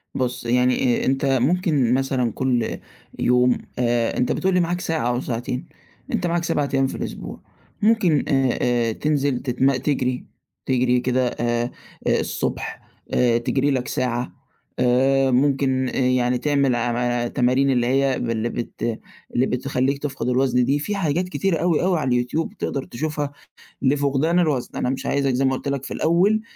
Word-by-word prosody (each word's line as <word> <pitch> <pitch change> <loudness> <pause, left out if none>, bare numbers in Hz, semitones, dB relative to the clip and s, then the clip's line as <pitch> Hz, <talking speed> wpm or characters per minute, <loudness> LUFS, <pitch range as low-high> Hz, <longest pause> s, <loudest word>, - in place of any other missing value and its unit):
بُصّ، 125 -1 -2
يعني 125 +1 +2
آآ، - - -1
أنت 135 +1 +1 0.2
ممكن 150 - +2
مثلًا 130 -3 0
كل 125 -2 -1 0.4
يوم 125 0 +3 0.2
آآ، 120 -1 +1
أنت 125 - +1
بتقول 190 0 0
لي 180 - +3
معاك 175 +1 0
ساعة 160 -6 -1
أو 125 +1 0
ساعتين، 125 +1 -3 0.5
أنت 180 - 0
معاك 170 0 0
7 145 -3 0
أيام 135 0 +3
في - - -6
الأسبوع، - - -6 0.4
ممكن 205 -9 +3
آآ، 135 -4 +2
آآ، 120 -2 +1
تنزِل 140 0 0
تتم 135 +1 +1
تجري، 130 -1 -1 0.4
تجري 125 -1 +2
كده 125 0 +1
آآ، 120 0 -1 0.4
الصبح - - -1 0.3
آآ، 120 -2 +3
تجري 135 +4 0
لك 130 -2 -1
ساعة، 125 -1 -2 0.5
آآ، 130 +2 +3
ممكن 130 0 +2
يعني 125 -1 +1
تعمل 140 -1 +1
عا 120 0 0
تمارين 130 +2 +2
اللي 120 -2 +2
هي 135 0 +2
باللي 115 0 -1
بت 115 -1 -4 0.4
اللي 125 - +3
بتخليك 130 +2 -1
تفقد 135 -4 -2
الوزن 125 -1 +2
دي، 140 +3 +1
في 205 +8 -2
حاجات 180 -1 0
كتيرة 190 -2 0
أوي، 170 -1 +1
أوي 180 -3 +2
على 140 - -2
اليوتيوب 125 +6 -1
تقدر 135 - -2
تشوفها 150 +2 -3 0.5
لفقدان 140 +4 +2
الوزن، 150 -8 +1
أنا 125 - 0
مش 135 - -3
عايزك 140 -1 +1
زي 130 +2 +1
ما 130 - +3
قلت 140 - -6
لك 140 -1 -2
في - - -5
الأول 190 +7 +2
130 Hz, 160 wpm, -22 LUFS, 125-145 Hz, 0.5 s, يوم